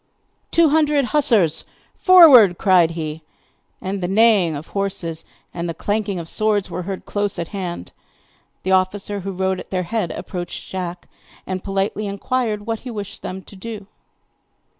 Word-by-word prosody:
'Two 335 -2 +4
hundred 300 -2 +3
hussars, 230 - +3 0.3
forward!' 275 - +8
cried 180 -4 +4
he. 155 0 -4 0.6
And 190 +1 -4
the 175 - -1
neighing 200 -5 +4
of 145 +3 -8
horses 185 -5 -3 0.3
and 170 0 -4
the 165 - -4
clanking 205 +1 -2
of 170 -2 -6
swords 210 +1 0
were 180 - -3
heard 190 - -5
close 205 -1 -2
at 170 - -4
hand. 180 - -5 0.7
The 190 - -1
officer 190 +2 +1
who 195 +1 -5
rode 190 0 -1
at - - -10
their 185 -1 -1
head 190 0 -2
approached 175 -1 -6
Jack, 180 -2 -5 0.4
and 185 -1 -4
politely 195 +1 -2
inquired 210 +1 -2
what 225 -1 -2
he 255 - -9
wished 205 -3 -7
them 190 +1 -6
to 200 - -14
do. 210 +1 -7
195 Hz, 160 wpm, -21 LUFS, 180-215 Hz, 0.7 s, forward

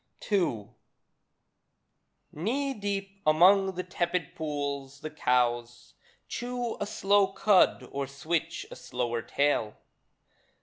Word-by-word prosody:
II 120 - +1 1.6
Knee 265 - -1
deep 200 -2 -4
among 190 +5 +5
the 180 - -3
tepid 175 -2 -2
pools 140 -4 -4
the 155 - -6
cows 120 -3 0 0.3
Chew 245 -1 -3
a 205 - -2
slow 200 -1 +3
cud 195 0 +3
or 140 0 -3
switch 165 +4 -2
a - - -7
slower 120 -2 -3
tail. 140 -5 0
165 Hz, 100 wpm, -29 LUFS, 140-195 Hz, 1.6 s, among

